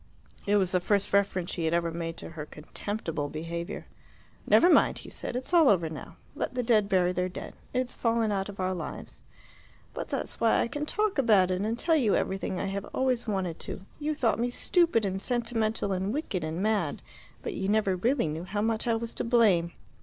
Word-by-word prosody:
It 205 Hz, -, +3 dB
was 190 Hz, -3 st, +2 dB
the 180 Hz, -, +3 dB
first 200 Hz, +2 st, 0 dB
reference 195 Hz, -3 st, +1 dB
she 170 Hz, -, -2 dB
had 160 Hz, +1 st, +2 dB
ever 170 Hz, -1 st, 0 dB
made 165 Hz, 0 st, -4 dB
to -, -, -8 dB
her 155 Hz, -2 st, -7 dB
contemptible 160 Hz, -1 st, -4 dB
behaviour. 170 Hz, +2 st, -5 dB, 0.6 s
"Never 345 Hz, -, +6 dB
mind," 360 Hz, -, +5 dB
he -, -, -10 dB
said. -, -, -4 dB
"It's 255 Hz, +7 st, -4 dB
all 330 Hz, -6 st, +7 dB
over 170 Hz, -5 st, +2 dB
now. 150 Hz, -, -8 dB, 0.2 s
Let -, -, -3 dB
the 250 Hz, -, 0 dB
dead 215 Hz, -4 st, +3 dB
bury 180 Hz, -2 st, +3 dB
their 180 Hz, 0 st, -1 dB
dead. 180 Hz, -, -8 dB, 0.2 s
It's 255 Hz, 0 st, -1 dB
fallen 230 Hz, -2 st, +1 dB
out 195 Hz, 0 st, -1 dB
of 200 Hz, -, -9 dB
our 185 Hz, 0 st, 0 dB
lives." 180 Hz, -, -7 dB, 0.7 s
"But -, -, -5 dB
that's -, -, -4 dB
why 230 Hz, -1 st, +4 dB
I -, -, +1 dB
can 295 Hz, +4 st, -3 dB
talk 420 Hz, -4 st, 0 dB
about 205 Hz, -8 st, +4 dB
it 185 Hz, +1 st, 0 dB
and 220 Hz, +3 st, -1 dB
tell 325 Hz, +5 st, +2 dB
you 230 Hz, -8 st, +3 dB
everything 190 Hz, -1 st, -1 dB
I -, -, -1 dB
have 195 Hz, 0 st, -3 dB
always 255 Hz, -3 st, +1 dB
wanted 190 Hz, -5 st, -2 dB
to. -, -, -5 dB, 0.2 s
You 305 Hz, 0 st, -1 dB
thought 235 Hz, -6 st, +1 dB
me 240 Hz, +1 st, +1 dB
stupid 325 Hz, -, +2 dB
and 190 Hz, 0 st, -2 dB
sentimental 225 Hz, -3 st, -1 dB
and 190 Hz, +2 st, -1 dB
wicked 230 Hz, -, -2 dB
and 160 Hz, +4 st, -3 dB
mad, 205 Hz, -8 st, 0 dB, 0.4 s
but -, -, -3 dB
you 190 Hz, -, -2 dB
never 205 Hz, -2 st, +2 dB
really 235 Hz, +6 st, +1 dB
knew 160 Hz, +3 st, -4 dB
how 205 Hz, +2 st, -2 dB
much 225 Hz, +1 st, 0 dB
I 230 Hz, -, +3 dB
was 230 Hz, 0 st, -4 dB
to -, -, -3 dB
blame." 210 Hz, -8 st, +3 dB
205 Hz, 215 wpm, -28 LUFS, 180-235 Hz, 0.7 s, all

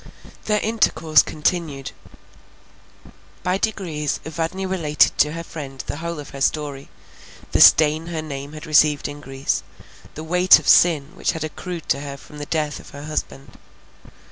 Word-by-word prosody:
Their 210 Hz, -1 st, +1 dB
intercourse 165 Hz, -8 st, +3 dB
continued. 155 Hz, -3 st, -2 dB, 1.5 s
By 180 Hz, +1 st, 0 dB
degrees 165 Hz, -10 st, -2 dB
Evadne 165 Hz, +4 st, -3 dB
related 165 Hz, -6 st, +2 dB
to 150 Hz, +1 st, +3 dB
her 165 Hz, 0 st, -5 dB
friend 140 Hz, -5 st, -8 dB
the -, -, -5 dB
whole 170 Hz, 0 st, -5 dB
of 145 Hz, -, -9 dB
her 135 Hz, -, -9 dB
story, 145 Hz, -2 st, -2 dB, 0.6 s
the -, -, +2 dB
stain 155 Hz, +1 st, +6 dB
her 165 Hz, -2 st, -4 dB
name 140 Hz, -1 st, -7 dB
had 155 Hz, 0 st, -9 dB
received 150 Hz, -2 st, +3 dB
in 145 Hz, 0 st, -8 dB
Greece, 135 Hz, -1 st, -2 dB, 0.5 s
the 155 Hz, -, -7 dB
weight 180 Hz, +3 st, +6 dB
of -, -, -8 dB
sin 155 Hz, -5 st, +5 dB
which 190 Hz, -, -1 dB
had 160 Hz, -2 st, -4 dB
accrued 170 Hz, +2 st, -6 dB
to 140 Hz, -, +2 dB
her 140 Hz, -1 st, -7 dB
from 150 Hz, +2 st, -13 dB
the 145 Hz, -, -6 dB
death 150 Hz, -2 st, -2 dB
of -, -, -14 dB
her 145 Hz, 0 st, -10 dB
husband. 150 Hz, -2 st, -6 dB
155 Hz, 160 wpm, -21 LUFS, 145-170 Hz, 1.5 s, stain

